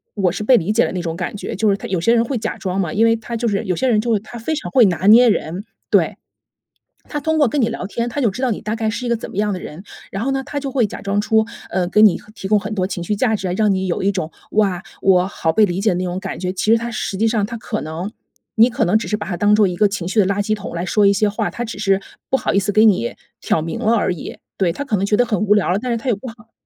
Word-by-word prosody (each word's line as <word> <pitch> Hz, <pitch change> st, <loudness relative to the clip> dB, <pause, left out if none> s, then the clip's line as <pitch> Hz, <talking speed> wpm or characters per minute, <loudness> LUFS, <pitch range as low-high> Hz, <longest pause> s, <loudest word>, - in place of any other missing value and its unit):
我 190 Hz, -4 st, +1 dB
是 205 Hz, -, -4 dB
被 250 Hz, +3 st, +5 dB
理 185 Hz, +4 st, -1 dB
解 230 Hz, -, +4 dB
的 -, -, -3 dB
那 180 Hz, -, -2 dB
种 165 Hz, -2 st, -4 dB
感 190 Hz, -, -4 dB
觉？” -, -, -5 dB
就 215 Hz, +2 st, +1 dB
是 200 Hz, -, +2 dB
他 -, -, -7 dB
有 185 Hz, -3 st, -1 dB
些 230 Hz, +7 st, +3 dB
人 230 Hz, 0 st, +3 dB
会 255 Hz, +1 st, -2 dB
假 -, -, -4 dB
装 190 Hz, 0 st, -3 dB
嘛， 170 Hz, -4 st, -2 dB
因 225 Hz, +2 st, +3 dB
为 225 Hz, 0 st, +4 dB
他 230 Hz, +1 st, -5 dB
就 235 Hz, +1 st, -1 dB
是 205 Hz, 0 st, 0 dB
有 185 Hz, -3 st, 0 dB
些 260 Hz, -, 0 dB
人 215 Hz, -4 st, +3 dB
就 230 Hz, +1 st, 0 dB
是 215 Hz, -, +2 dB
他 235 Hz, +3 st, -11 dB
非 315 Hz, +8 st, -2 dB
常 305 Hz, -, -5 dB
会 255 Hz, -3 st, +6 dB
拿 180 Hz, -1 st, 0 dB
捏 235 Hz, +3 st, +8 dB
人， 180 Hz, -2 st, -2 dB, 0.3 s
对。 -, -, +2 dB, 0.9 s
他 295 Hz, -, -3 dB
通 315 Hz, +2 st, 0 dB
过 290 Hz, -6 st, +4 dB
跟 285 Hz, +1 st, 0 dB
你 225 Hz, -, +2 dB
聊 230 Hz, -4 st, -4 dB
天， 235 Hz, +4 st, -3 dB
他 285 Hz, +4 st, -3 dB
就 235 Hz, -, +3 dB
知 245 Hz, -, -7 dB
道 260 Hz, -, +1 dB
你 210 Hz, -, -3 dB
大 215 Hz, +2 st, -3 dB
概 220 Hz, -1 st, 0 dB
是 240 Hz, +3 st, -4 dB
一 240 Hz, -, -2 dB
个 235 Hz, -, +1 dB
怎 -, -, -8 dB
么 -, -, -11 dB
样 210 Hz, 0 st, +1 dB
的 185 Hz, -, -4 dB
人， 170 Hz, +4 st, -9 dB, 0.3 s
然 195 Hz, +3 st, -3 dB
后 270 Hz, -, 0 dB
呢， 270 Hz, 0 st, -1 dB
他 290 Hz, -, -6 dB
就 275 Hz, -2 st, -4 dB
会 245 Hz, -5 st, +2 dB
假 -, -, -8 dB
装 200 Hz, +1 st, -1 dB
出， 220 Hz, +1 st, +2 dB, 0.3 s
呃， 180 Hz, -1 st, 0 dB
给 210 Hz, -, +3 dB
你 215 Hz, -4 st, +6 dB, 0.2 s
提 195 Hz, -, -6 dB
供 210 Hz, +1 st, +4 dB
很 215 Hz, +1 st, -5 dB
多 185 Hz, -2 st, -1 dB
情 175 Hz, -2 st, -4 dB
绪 190 Hz, -, -1 dB
价 220 Hz, +1 st, +1 dB
值 190 Hz, -3 st, -3 dB
啊， -, -, -1 dB
让 215 Hz, -1 st, +3 dB
你 190 Hz, 0 st, -1 dB
有 170 Hz, -, -1 dB
一 200 Hz, -, +3 dB
种， 175 Hz, -4 st, -4 dB, 0.2 s
哇， 195 Hz, -4 st, +1 dB, 0.2 s
我 185 Hz, -1 st, +4 dB
好 165 Hz, -4 st, -1 dB
被 215 Hz, +5 st, +4 dB
理 185 Hz, 0 st, -3 dB
解 215 Hz, -, +2 dB
的 175 Hz, -, 0 dB
那 185 Hz, -, -2 dB
种 180 Hz, 0 st, -3 dB
感 -, -, -5 dB
觉。 180 Hz, 0 st, -2 dB
其 210 Hz, +4 st, 0 dB
实 230 Hz, -, +6 dB
他 235 Hz, +1 st, -4 dB
实 205 Hz, -3 st, -3 dB
际 225 Hz, +3 st, +2 dB
上， 220 Hz, -3 st, +1 dB
他 230 Hz, +1 st, -6 dB
可 220 Hz, 0 st, -4 dB
能 160 Hz, +6 st, -5 dB, 0.5 s
你 230 Hz, +2 st, +6 dB
可 245 Hz, -, 0 dB
能 200 Hz, +5 st, +3 dB
只 220 Hz, -, -5 dB
是 210 Hz, -, 0 dB
把 205 Hz, -, -6 dB
他 180 Hz, -, -2 dB
当 205 Hz, +4 st, +3 dB
做 210 Hz, -1 st, +5 dB
一 180 Hz, -, -3 dB
个 205 Hz, +3 st, +3 dB
情 195 Hz, -4 st, -4 dB
绪 200 Hz, -, -4 dB
的 -, -, +2 dB
垃 200 Hz, +1 st, 0 dB
圾 215 Hz, +1 st, 0 dB
桶 205 Hz, -3 st, -8 dB
来 170 Hz, +2 st, -2 dB
说 205 Hz, +3 st, +2 dB
一 200 Hz, -, +6 dB
些 210 Hz, +2 st, +2 dB
话， 205 Hz, -, -1 dB
他 240 Hz, -, -5 dB
只 225 Hz, -, -7 dB
是 195 Hz, -1 st, +1 dB, 0.3 s
不 265 Hz, -, +3 dB
好 -, -, -1 dB
意 200 Hz, -, +4 dB
思 200 Hz, +1 st, -1 dB
给 215 Hz, +2 st, +5 dB
你 180 Hz, -, +2 dB, 0.3 s
挑 160 Hz, -, +1 dB
明 165 Hz, -, -4 dB
了 220 Hz, -, +2 dB
而 205 Hz, -, +1 dB
已。 170 Hz, -, -8 dB, 0.2 s
对， 180 Hz, -4 st, +2 dB
他 285 Hz, +11 st, -5 dB
可 225 Hz, -6 st, 0 dB
能 195 Hz, -, 0 dB
觉 210 Hz, +1 st, +1 dB
得 245 Hz, -, +3 dB
很 215 Hz, -6 st, -1 dB
无 210 Hz, -1 st, +4 dB
聊 205 Hz, -, +1 dB
了， 195 Hz, -, 0 dB
但 250 Hz, +2 st, -3 dB
是 235 Hz, -, 0 dB
他 240 Hz, -, -8 dB
也 235 Hz, -, +2 dB
不 205 Hz, +6 st, -10 dB
好 230 Hz, 0 st, -16 dB
210 Hz, 355 characters per minute, -19 LUFS, 190-230 Hz, 0.9 s, 捏